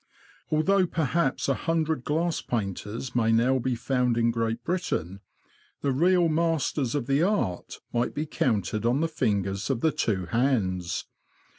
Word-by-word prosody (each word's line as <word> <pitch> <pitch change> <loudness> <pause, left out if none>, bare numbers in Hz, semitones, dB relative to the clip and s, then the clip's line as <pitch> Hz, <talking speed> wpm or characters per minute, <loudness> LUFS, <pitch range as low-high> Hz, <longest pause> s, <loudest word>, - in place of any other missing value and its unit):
Although 185 +5 +3
perhaps 160 -2 0
a 135 - +3
hundred 160 -2 -1
glass 160 +3 0
painters 110 +3 -4
may 115 -2 +3
now 125 +4 +3
be 130 0 -1
found 125 0 0
in 115 0 +3
Great 115 0 -2
Britain, 100 - -2 0.6
the 140 - +1
real 175 +5 +3
masters 155 -5 0
of 140 -5 -1
the 140 +3 +2
art 175 - -1
might 120 0 0
be 150 - -1
counted 110 - -1
on 120 +4 +2
the 165 0 0
lingers 100 -3 0
of 130 -4 0
the 160 - +3
two 95 -9 -1
hands. 95 -5 0
125 Hz, 150 wpm, -27 LUFS, 115-160 Hz, 0.6 s, Although